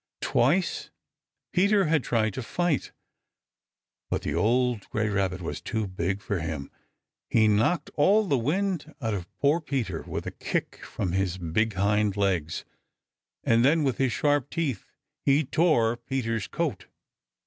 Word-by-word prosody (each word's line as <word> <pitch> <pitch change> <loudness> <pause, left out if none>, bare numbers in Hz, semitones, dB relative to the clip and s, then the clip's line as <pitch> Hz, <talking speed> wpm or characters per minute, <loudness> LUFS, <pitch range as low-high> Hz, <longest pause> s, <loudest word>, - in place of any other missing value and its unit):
Twice 160 +10 +1 0.6
Peter 200 +1 +4
had 155 -3 +2
tried 110 -3 +1
to 130 - -4
fight, 175 +4 -1 1.2
but - - -1
the - - -2
old 115 +4 +1
gray 110 0 0
Rabbit 95 -3 -1
was 85 - -4
too 110 -1 -2
big 95 +2 -2
for 100 -3 -1
him. 80 -3 -4 0.6
He 110 -1 +4
knocked 115 +10 +2
all 200 +9 +4
the 145 - +2
wind 160 - -1
out 110 -5 -1
of 95 -3 -5
poor 150 +4 +2
Peter 115 - -2
with - - -5
a - - -4
kick - - -3
from 90 - -3
his 95 -1 0
big 95 +6 0
hind 105 +1 +1
legs, 90 -6 0 0.8
and 115 +1 +4
then 155 +4 +4
with 135 -3 0
his 135 -2 +2
sharp 145 -1 +1
teeth 150 - -2 0.4
he 140 +3 +4
tore 120 -7 +2
Peter's 115 -4 -2
coat. 150 - -3
115 Hz, 150 wpm, -27 LUFS, 100-150 Hz, 1.2 s, Peter